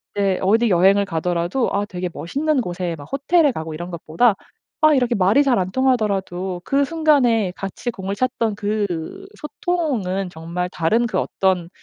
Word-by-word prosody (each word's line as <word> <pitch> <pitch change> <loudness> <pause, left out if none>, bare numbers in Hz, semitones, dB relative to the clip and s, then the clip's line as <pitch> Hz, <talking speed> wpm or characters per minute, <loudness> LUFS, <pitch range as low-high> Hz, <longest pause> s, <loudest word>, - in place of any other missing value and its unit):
이제 195 -2 +1
어디 225 +5 +3
여행을 195 +2 +4
가더라도 175 +5 -1
아 200 +1 0
되게 180 -2 -5
멋있는 285 - -1
곳에 175 -4 -3
막 145 - -10
호텔에 290 +2 +3
가고 160 -7 -6
이런 175 +3 -7
것보다 170 +7 +2 0.5
아 310 0 +6
이렇게 250 -2 +1
말이 200 +8 +4
잘 260 -6 +2
안 185 0 -2
통하더라도 195 -8 0
그 280 +1 +2
순간에 265 - +2
같이 195 +5 -5
공을 195 -3 -5
찼던 230 -2 -1
그 205 - -3
소통은 270 - -2
정말 170 +2 -4
다른 200 +8 +1
그 195 -5 -1
어떤 185 -3 0
200 Hz, 325 characters per minute, -21 LUFS, 180-255 Hz, 0.5 s, 아